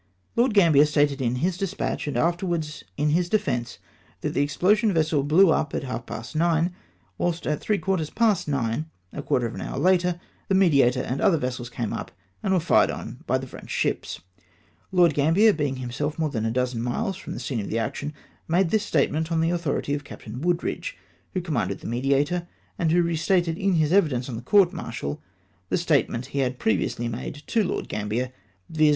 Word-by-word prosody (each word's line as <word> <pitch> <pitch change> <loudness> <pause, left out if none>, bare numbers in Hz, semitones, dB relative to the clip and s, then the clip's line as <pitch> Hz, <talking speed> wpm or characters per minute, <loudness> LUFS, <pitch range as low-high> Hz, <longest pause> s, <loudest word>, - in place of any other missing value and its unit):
Lord. 235 -2 +2
Gambier 160 -7 +6
stated 145 -2 +2
in 120 -1 0
his 180 0 -1
despatch, 195 -5 -2
and 145 - -2
afterwards 170 0 -1
in 150 +1 +1
his 175 +2 +1
defence, 135 - -1 0.4
that - - -2
the - - +1
explosion 205 +9 +2
vessel 155 -4 +2
blew 160 +6 +5
up 155 -1 0
at - - -2
half 125 -3 -5
past 115 +7 -7
nine, 170 +2 +2 0.5
whilst 175 -1 -1
at 150 - 0
three 210 - 0
quarters 185 -6 -1
past 220 -7 +2
nine 140 +2 -1 0.2
[a - - -4
quarter 125 - 0
of 115 - -4
an - - -6
hour - - -5
later\ 180 -1 +2 0.3
the 190 - +2
Mediator 140 -10 +4
and 130 +3 -3
other 190 -5 +4
vessels 125 -3 -3
came 120 -3 -3
up, - - -5 0.3
and - - -1
were 185 - +4
fired 165 - +4
on - - -6
by - - +2
the - - -5
French - - -11
ships! - - -2 0.7
Lord 175 -4 +5
Gambier, 165 +10 +4
being 145 -5 -1
himself 130 +4 -3
more 160 -2 0
than 115 -4 -1
a - - 0
dozen 125 -1 -1
miles 190 - -1
from - - -7
the - - -5
scene 125 -5 -3
of 100 - -4
action, 115 +6 -2 0.4
made 175 +1 +2
this 220 -1 +2
statement 160 -5 0
on 165 - +2
the 165 +1 +2
authority 165 -4 -1
of 145 0 -2
Captain 120 -3 -9
Wooldridge, 175 - -1 0.4
who 185 - +1
commanded 160 -8 -2
the - - -7
Mediator, 140 +8 0 0.3
and 165 -2 +2
who 175 +1 +4
reiterated 170 +1 +1
in 195 +2 +1
his 155 0 +2
evidence 145 -11 +2
on 125 - -5
the 115 - -5
court 190 +7 +4
martial 115 - -5 0.5
the - - +2
statement 145 -7 +1
he 140 - 0
had 130 -1 0
previously 110 +2 0
made 125 +5 -6
to 225 - +1
Lord 180 - -2
Gambier, 110 +5 -2 0.4
viz. 155 -1 +3
155 Hz, 195 wpm, -25 LUFS, 130-175 Hz, 0.7 s, Gambier